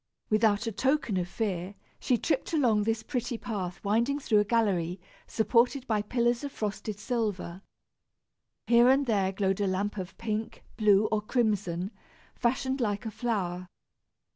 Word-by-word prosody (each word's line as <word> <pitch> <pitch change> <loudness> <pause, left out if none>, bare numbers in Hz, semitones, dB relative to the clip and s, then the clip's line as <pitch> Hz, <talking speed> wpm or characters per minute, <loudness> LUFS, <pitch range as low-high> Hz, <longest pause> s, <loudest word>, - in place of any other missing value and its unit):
Without 215 0 +3
a 225 - -1
token 260 0 0
of 180 -1 -1
fear, 185 0 -3 0.2
she 250 - +2
tripped 295 +5 -1
along 240 -9 +3
this 220 +1 -1
pretty 245 -2 -3
path 190 -6 -4
winding 230 +7 +1
through 230 -7 +2
a - - +4
gallery 195 -5 0 0.3
supported 240 +4 +2
by 215 -4 +1
pillars 240 +3 0
of 285 - -4
frosted 210 -2 -4
silver. 205 -5 -3 1.0
Here 240 +1 +6
and 275 +2 +4
there 200 -5 +1
glowed 195 0 0
a 200 - +1
lamp 200 +2 -1
of 185 0 -7
pink, 220 -1 -4
blue 210 -1 +4
or 215 -1 +1
crimson, 205 -5 0 0.4
fashioned 260 +2 0
like 205 -3 -1
a 220 - -3
flower. 185 -6 -2
215 Hz, 150 wpm, -29 LUFS, 195-240 Hz, 1.0 s, Here